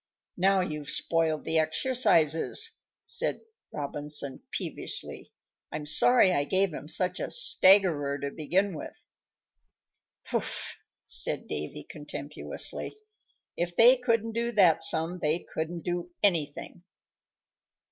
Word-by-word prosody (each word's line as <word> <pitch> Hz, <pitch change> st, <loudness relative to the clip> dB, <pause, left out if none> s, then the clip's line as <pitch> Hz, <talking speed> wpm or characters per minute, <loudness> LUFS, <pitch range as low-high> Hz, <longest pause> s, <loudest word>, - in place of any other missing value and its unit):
"Now 190 Hz, +1 st, +3 dB
you've 150 Hz, -5 st, -5 dB
spoiled 160 Hz, -2 st, 0 dB
the 160 Hz, 0 st, +1 dB
exercises," 165 Hz, -, +3 dB, 0.3 s
said -, -, 0 dB, 0.3 s
Robinson, 145 Hz, -1 st, -3 dB
peevishly. -, -, -6 dB, 0.4 s
"I'm 150 Hz, -1 st, -5 dB
sorry 190 Hz, +7 st, +4 dB
I 145 Hz, -, +1 dB
gave 190 Hz, +3 st, 0 dB
'em 150 Hz, -, -8 dB
such 180 Hz, +3 st, -1 dB
a -, -, -4 dB
staggerer 185 Hz, -, +3 dB
to 140 Hz, 0 st, -4 dB
begin 180 Hz, +6 st, -1 dB
with." 150 Hz, -, -9 dB, 1.3 s
"Pooh!" -, -, -1 dB, 0.6 s
said -, -, -1 dB
Davy, 75 Hz, 0 st, -5 dB
contemptuously. 150 Hz, -, -4 dB, 0.6 s
"If 175 Hz, 0 st, -3 dB
they 245 Hz, +3 st, +7 dB
couldn't 230 Hz, -2 st, -1 dB
do 235 Hz, +1 st, -2 dB
that 175 Hz, -6 st, +4 dB
sum 165 Hz, +2 st, +1 dB
they 155 Hz, +2 st, -1 dB
couldn't 165 Hz, +2 st, -4 dB
do 175 Hz, 0 st, -4 dB
anything." 170 Hz, -3 st, 0 dB
165 Hz, 110 wpm, -27 LUFS, 150-195 Hz, 1.3 s, they